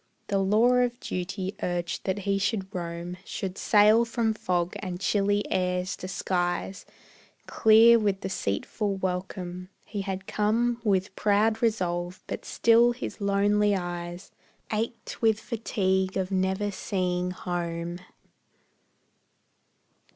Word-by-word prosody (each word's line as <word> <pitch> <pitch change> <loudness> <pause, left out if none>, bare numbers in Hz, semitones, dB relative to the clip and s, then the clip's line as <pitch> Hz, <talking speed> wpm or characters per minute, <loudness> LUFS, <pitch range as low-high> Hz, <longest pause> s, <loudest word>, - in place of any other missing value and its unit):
The 200 -1 +2
law 210 +5 +4
of 245 0 +1
duty 185 0 -4
urged 175 -1 -2
that 190 0 0
he 200 0 +1
should 195 -1 -1
roam, 170 0 -5
Should 190 -2 -5
sail 215 +2 +5
from 230 -1 0
fog 180 -4 -1
and 180 -3 -5
chilly 205 +1 +1
airs 180 +1 0
to 185 - -6
skies 180 0 -2 0.6
Clear 225 +2 +6
with 200 -3 0
deceitful 190 - -2
welcome. 180 -1 -4 0.2
He 205 - -4
had 190 -1 -4
come 230 +4 0
With 190 -3 +1
proud 215 +2 +2
resolve, 180 -6 -1
but - - -6
still 235 +1 +4
his 240 -2 -7
lonely 205 +1 +2
eyes 175 0 -5 0.4
Ached 225 +2 -4
with 220 -2 +3
fatigue 190 -5 -1
at 190 0 -2
never 190 +2 0
seeing 180 -2 -1
home. 175 -1 -4
195 Hz, 120 wpm, -27 LUFS, 180-215 Hz, 0.6 s, Clear